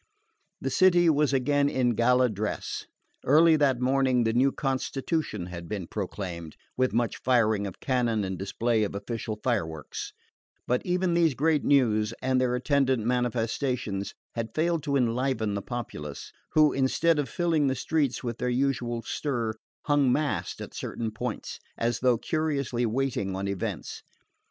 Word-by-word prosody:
The -, -, -3 dB
city 175 Hz, -3 st, +5 dB
was 150 Hz, -1 st, +2 dB
again 140 Hz, +2 st, +2 dB
in 125 Hz, -3 st, +1 dB
gala 125 Hz, +3 st, +3 dB
dress. 105 Hz, -2 st, -4 dB, 0.4 s
Early 160 Hz, +4 st, +6 dB
that 135 Hz, -4 st, +2 dB
morning 130 Hz, -1 st, +2 dB
the 110 Hz, 0 st, +1 dB
new 130 Hz, +3 st, +3 dB
constitution 135 Hz, -, -2 dB
had 85 Hz, -1 st, -8 dB
been 100 Hz, -4 st, -3 dB
proclaimed, 90 Hz, -4 st, -5 dB, 0.2 s
with 130 Hz, 0 st, +1 dB
much 115 Hz, +1 st, 0 dB
firing 110 Hz, -5 st, +2 dB
of 95 Hz, -, -9 dB
cannon 120 Hz, -5 st, 0 dB
and 95 Hz, -1 st, -3 dB
display 110 Hz, +4 st, 0 dB
of 100 Hz, -, -3 dB
official 110 Hz, +1 st, -4 dB
fireworks; 80 Hz, -, -2 dB, 0.5 s
but 125 Hz, 0 st, 0 dB
even 180 Hz, 0 st, +1 dB
these 165 Hz, -5 st, +3 dB
great 155 Hz, +1 st, +2 dB
news, 115 Hz, -5 st, +3 dB
and 130 Hz, 0 st, +1 dB
their 125 Hz, -1 st, +1 dB
attendant 130 Hz, -3 st, +1 dB
manifestations, 120 Hz, -3 st, -1 dB, 0.2 s
had 115 Hz, -1 st, -4 dB
failed 165 Hz, +1 st, +1 dB
to 140 Hz, -, 0 dB
enliven 120 Hz, -3 st, +1 dB
the 100 Hz, -, -2 dB
populace, 85 Hz, -, -6 dB, 0.2 s
who, 155 Hz, -1 st, +5 dB
instead 150 Hz, +4 st, +2 dB
of 140 Hz, -4 st, -1 dB
filling 165 Hz, -3 st, +1 dB
the 130 Hz, -, +1 dB
streets 140 Hz, 0 st, 0 dB
with 120 Hz, -1 st, -4 dB
their 125 Hz, -, 0 dB
usual 120 Hz, -2 st, 0 dB
stir, 120 Hz, -7 st, -2 dB, 0.3 s
hung 145 Hz, -3 st, +3 dB
massed 105 Hz, -, -1 dB
at -, -, -8 dB
certain 115 Hz, -1 st, -4 dB
points, 110 Hz, -, -5 dB, 0.2 s
as 115 Hz, 0 st, 0 dB
though 125 Hz, -2 st, +3 dB
curiously 140 Hz, -5 st, -1 dB
waiting 115 Hz, -5 st, -1 dB
on 95 Hz, +1 st, -3 dB
events. 100 Hz, -2 st, -4 dB
125 Hz, 150 wpm, -27 LUFS, 110-140 Hz, 0.5 s, Early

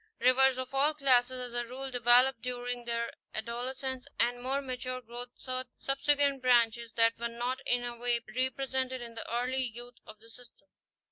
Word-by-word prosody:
Rivers 255 Hz, +1 st, +5 dB
of 260 Hz, +1 st, -5 dB
all 290 Hz, +3 st, +3 dB
classes 255 Hz, -3 st, +3 dB
as 250 Hz, -1 st, -5 dB
a 240 Hz, 0 st, -2 dB
rule 265 Hz, +2 st, -6 dB
develop 245 Hz, 0 st, +4 dB
during 245 Hz, 0 st, -4 dB
their 235 Hz, 0 st, -1 dB, 0.2 s
adolescence 255 Hz, +4 st, -3 dB
and 245 Hz, 0 st, +1 dB
more 265 Hz, +2 st, 0 dB
mature 255 Hz, -1 st, -4 dB
.growth 245 Hz, +1 st, -8 dB
certain 255 Hz, -1 st, -4 dB
"subsequent" 280 Hz, 0 st, +1 dB
branches 235 Hz, -2 st, +3 dB
that 230 Hz, 0 st, +3 dB
were 235 Hz, -, -1 dB
not 240 Hz, +2 st, -3 dB
in 245 Hz, 0 st, +2 dB
any 240 Hz, -1 st, -5 dB
way 240 Hz, 0 st, +2 dB, 0.2 s
represented 260 Hz, 0 st, 0 dB
in 235 Hz, -1 st, -8 dB
the 225 Hz, -, -6 dB
early 250 Hz, +2 st, 0 dB
youth 245 Hz, 0 st, -5 dB
of 215 Hz, -, -10 dB
the 225 Hz, +2 st, -16 dB
system. 245 Hz, +1 st, -14 dB
250 Hz, 175 wpm, -31 LUFS, 240-260 Hz, 0.2 s, Rivers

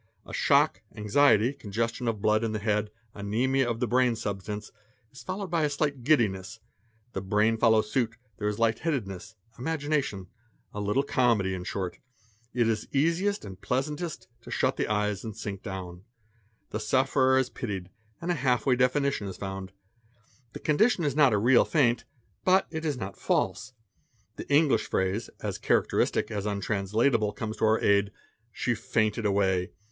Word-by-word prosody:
A -, -, -11 dB
shock, 95 Hz, -, +3 dB
anxiety, 110 Hz, +2 st, +3 dB
congestion 115 Hz, 0 st, -3 dB
of 110 Hz, -3 st, -2 dB
blood 110 Hz, +1 st, +3 dB
in 110 Hz, -1 st, -1 dB
the -, -, -1 dB
head, 105 Hz, 0 st, 0 dB, 0.3 s
anzmia 120 Hz, +6 st, +1 dB
of 115 Hz, -1 st, -2 dB
the 125 Hz, -, +1 dB
brain 125 Hz, -1 st, +3 dB
substance, 105 Hz, 0 st, -5 dB, 0.4 s
is 135 Hz, -, -12 dB
followed 190 Hz, 0 st, -5 dB
by 170 Hz, -2 st, +2 dB
a 150 Hz, -, +2 dB
slight 145 Hz, -3 st, -2 dB
giddiness; 105 Hz, -10 st, +1 dB, 0.5 s
the 95 Hz, -, -3 dB
brain 105 Hz, +3 st, +2 dB
follows 110 Hz, -2 st, +3 dB
suit, 115 Hz, -3 st, 0 dB, 0.2 s
there 105 Hz, -, -1 dB
is 105 Hz, 0 st, -1 dB
light 115 Hz, -1 st, +2 dB
headedness, 115 Hz, -, -3 dB, 0.2 s
imagination, 145 Hz, -, -1 dB, 0.5 s
a 105 Hz, -, -4 dB
little 105 Hz, +7 st, +1 dB
comedy 115 Hz, -8 st, +2 dB
in 90 Hz, -1 st, -4 dB
short. 90 Hz, -2 st, -4 dB, 0.5 s
It 120 Hz, -2 st, +1 dB
is 110 Hz, -1 st, -1 dB
easiest 170 Hz, -, +1 dB
and 95 Hz, -1 st, -10 dB
pleasantest 150 Hz, +6 st, -3 dB
to -, -, -12 dB
shut -, -, +1 dB
the -, -, -1 dB
eyes 105 Hz, -2 st, -1 dB
and 110 Hz, -3 st, -7 dB
sink 100 Hz, -2 st, -5 dB
down. 90 Hz, -2 st, -7 dB, 0.7 s
The 110 Hz, -, -2 dB
sufferer 130 Hz, +3 st, +3 dB
is 130 Hz, -1 st, +1 dB
pitied 95 Hz, -6 st, -5 dB, 0.3 s
and 170 Hz, +1 st, -2 dB
a -, -, +3 dB
half 130 Hz, -5 st, +1 dB
way 130 Hz, -2 st, +4 dB
definition 125 Hz, -2 st, +1 dB
is 95 Hz, -, -7 dB
found: 95 Hz, -1 st, -6 dB, 0.8 s
the -, -, -7 dB
condition 180 Hz, +5 st, +2 dB
is 145 Hz, -3 st, 0 dB
not 145 Hz, -4 st, +5 dB
a 105 Hz, -, +3 dB
real 120 Hz, +4 st, +5 dB
faint, 125 Hz, -7 st, +2 dB, 0.4 s
but 190 Hz, +1 st, +4 dB
it 160 Hz, 0 st, -4 dB
is 150 Hz, -4 st, -1 dB
not 95 Hz, -4 st, -6 dB
false. -, -, -1 dB, 0.6 s
The -, -, -7 dB
English 145 Hz, 0 st, +3 dB
phrase, 95 Hz, +4 st, -1 dB
as -, -, -3 dB
characteristic -, -, +1 dB
as 105 Hz, 0 st, -3 dB
untranslat 100 Hz, +1 st, 0 dB
able, 105 Hz, -3 st, +1 dB
comes 110 Hz, -1 st, -5 dB
to -, -, +1 dB
our 110 Hz, +1 st, +3 dB
aid, 100 Hz, 0 st, +3 dB, 0.4 s
"she 125 Hz, -, -1 dB
fainted 110 Hz, -1 st, 0 dB
away. 95 Hz, -2 st, +1 dB
115 Hz, 170 wpm, -28 LUFS, 100-135 Hz, 0.8 s, not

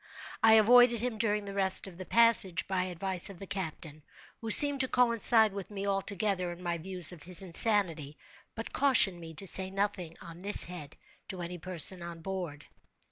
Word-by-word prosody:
I 225 Hz, 0 st, +5 dB
avoided 235 Hz, +2 st, +4 dB
him 235 Hz, -1 st, -5 dB
during 210 Hz, -2 st, -1 dB
the 200 Hz, -, -8 dB
rest 190 Hz, -1 st, +1 dB
of 185 Hz, -2 st, -12 dB
the 185 Hz, -, -9 dB
passage, 225 Hz, -7 st, +4 dB
by 185 Hz, -1 st, -2 dB
advice 185 Hz, +1 st, -1 dB
of 195 Hz, -, -12 dB
the 195 Hz, -, -10 dB
captain, 160 Hz, -5 st, -7 dB, 0.4 s
who 225 Hz, -, -7 dB
seemed 285 Hz, +5 st, +6 dB
to 260 Hz, -, 0 dB
coincide 230 Hz, -3 st, +2 dB
with 200 Hz, -2 st, -8 dB
me 200 Hz, -1 st, -7 dB
altogether 195 Hz, -2 st, -3 dB
in 175 Hz, +1 st, -12 dB
my 170 Hz, -1 st, -4 dB
views 180 Hz, 0 st, 0 dB
of 175 Hz, -4 st, -14 dB
his 180 Hz, +2 st, -1 dB
insanity, 170 Hz, -6 st, 0 dB, 0.4 s
but 225 Hz, -, -8 dB
cautioned 240 Hz, -10 st, +1 dB
me 165 Hz, -1 st, -12 dB
to 195 Hz, -, -8 dB
say 190 Hz, 0 st, +1 dB
nothing 195 Hz, -4 st, -5 dB
on 170 Hz, +1 st, -13 dB
this 205 Hz, +2 st, +2 dB
head 160 Hz, -4 st, -10 dB, 0.3 s
to 180 Hz, -2 st, -8 dB
any 175 Hz, +1 st, -8 dB
person 180 Hz, +1 st, +3 dB
on 170 Hz, -1 st, -10 dB
board. 175 Hz, -6 st, -7 dB
190 Hz, 190 wpm, -29 LUFS, 175-210 Hz, 0.4 s, seemed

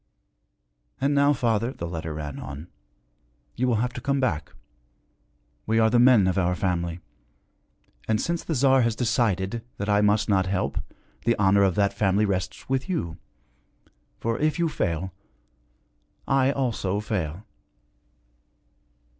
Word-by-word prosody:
'And 140 Hz, +2 st, +1 dB
now, 140 Hz, 0 st, +4 dB
father,' 115 Hz, -3 st, 0 dB
the 85 Hz, -, -6 dB
letter 80 Hz, -1 st, -5 dB
ran 75 Hz, -2 st, -6 dB
on, 70 Hz, +6 st, -8 dB, 0.9 s
'you 125 Hz, -, 0 dB
will 120 Hz, -, +2 dB
have 125 Hz, -, -5 dB
to 125 Hz, -, -6 dB
come 140 Hz, +1 st, 0 dB
back. 85 Hz, -, -1 dB, 1.2 s
We 110 Hz, +1 st, +2 dB
are 110 Hz, 0 st, +4 dB
the 120 Hz, -, +4 dB
men 120 Hz, -5 st, +6 dB
of 95 Hz, +1 st, +1 dB
our 90 Hz, 0 st, +1 dB
family. 85 Hz, -3 st, -2 dB, 1.1 s
And, 110 Hz, -1 st, +1 dB
since 170 Hz, 0 st, -2 dB
the 160 Hz, -, -2 dB
Tsar 135 Hz, 0 st, +4 dB
has 115 Hz, -2 st, +1 dB
decided 115 Hz, -3 st, 0 dB
that 100 Hz, +1 st, -3 dB
I 105 Hz, 0 st, +4 dB
must 105 Hz, +1 st, +2 dB
not 95 Hz, -3 st, +2 dB
help, 95 Hz, 0 st, -1 dB, 0.4 s
the 115 Hz, 0 st, +2 dB
honor 100 Hz, 0 st, +3 dB
of 95 Hz, -3 st, +3 dB
that 100 Hz, -1 st, +2 dB
family 100 Hz, +1 st, +2 dB
rests 95 Hz, 0 st, -3 dB
with 135 Hz, +6 st, -1 dB
you. 85 Hz, -, -3 dB, 1.0 s
For, 115 Hz, 0 st, -1 dB
if 155 Hz, +2 st, +1 dB
you 170 Hz, -1 st, +1 dB
fail, 90 Hz, -, -2 dB, 1.1 s
I 135 Hz, 0 st, +3 dB
also 115 Hz, -8 st, -1 dB
fail.' 100 Hz, -3 st, -3 dB
105 Hz, 145 wpm, -25 LUFS, 95-125 Hz, 1.2 s, men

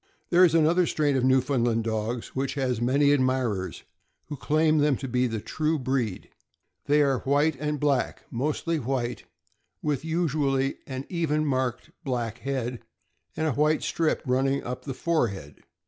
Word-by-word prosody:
There 180 Hz, +1 st, +6 dB
is 165 Hz, -3 st, +5 dB
another 165 Hz, +2 st, +4 dB
strain 145 Hz, -2 st, +1 dB
of 130 Hz, -, +1 dB
Newfoundland 130 Hz, -3 st, +2 dB
dogs 110 Hz, +1 st, -2 dB
which 135 Hz, +2 st, -2 dB
has 125 Hz, -4 st, -1 dB
many 140 Hz, +4 st, +3 dB
admirers, 130 Hz, -8 st, 0 dB, 0.5 s
who 150 Hz, -, -4 dB
claim 155 Hz, +2 st, +2 dB
them 145 Hz, -1 st, +3 dB
to 135 Hz, -, -5 dB
be 125 Hz, 0 st, +1 dB
of 120 Hz, -, -2 dB
the 110 Hz, -, -2 dB
true 155 Hz, +8 st, -1 dB
breed. 130 Hz, -7 st, -2 dB, 0.6 s
They 150 Hz, +1 st, +4 dB
are 135 Hz, -2 st, +1 dB
white 145 Hz, +3 st, +2 dB
and 150 Hz, 0 st, -2 dB
black 140 Hz, -3 st, 0 dB
— -, -, -38 dB
mostly 155 Hz, +6 st, -1 dB
white, 125 Hz, -2 st, -3 dB, 0.6 s
with 150 Hz, -2 st, -1 dB
usually 145 Hz, -5 st, 0 dB
an 130 Hz, 0 st, -5 dB
even 155 Hz, -3 st, 0 dB
marked 130 Hz, +1 st, -1 dB
black 120 Hz, -5 st, -3 dB
head, 125 Hz, -3 st, -3 dB, 0.6 s
with 160 Hz, -, 0 dB
a 155 Hz, -, +2 dB
white 150 Hz, +4 st, +2 dB
strip 160 Hz, -2 st, 0 dB
running 135 Hz, +2 st, +1 dB
up 125 Hz, +1 st, -6 dB
the 135 Hz, -3 st, -4 dB
forehead. 100 Hz, -, -2 dB
135 Hz, 165 wpm, -26 LUFS, 125-150 Hz, 0.6 s, There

